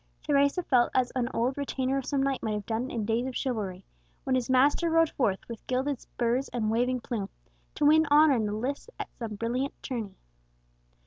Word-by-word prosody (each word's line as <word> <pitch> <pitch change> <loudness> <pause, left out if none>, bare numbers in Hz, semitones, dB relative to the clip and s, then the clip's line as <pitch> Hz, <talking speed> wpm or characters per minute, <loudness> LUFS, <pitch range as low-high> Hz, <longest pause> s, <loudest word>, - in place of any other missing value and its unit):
Teresa 285 +4 +2
felt 245 -6 +3
as 255 -1 +2
an 250 -1 -1
old 255 +4 -1
retainer 270 -1 -1
of 270 -2 -2
some 275 -2 +1
knight 275 -1 0
might 220 - -2
have 210 -1 -4
done 230 +3 -2
in 225 -5 -3
days 230 +3 0
of 260 - -6
chivalry, 200 -8 -3 0.4
when 265 - -1
his 255 -1 0
master 280 +6 +3
rode 330 -1 +3
forth, 200 -8 -1
with 230 -2 -9
gilded 260 +1 -1
spurs 245 +2 -1
and 220 -3 -1
waving 250 +2 +1
plume, 215 -5 -4 0.5
to 295 - +1
win 315 +1 +5
honour 295 0 +6
in 220 -4 +1
the - - -2
lists 260 - -3
at - - -6
some 225 -3 -4
brilliant 245 +6 -2
tourney. 225 -7 -5
255 Hz, 200 wpm, -28 LUFS, 230-275 Hz, 0.5 s, honour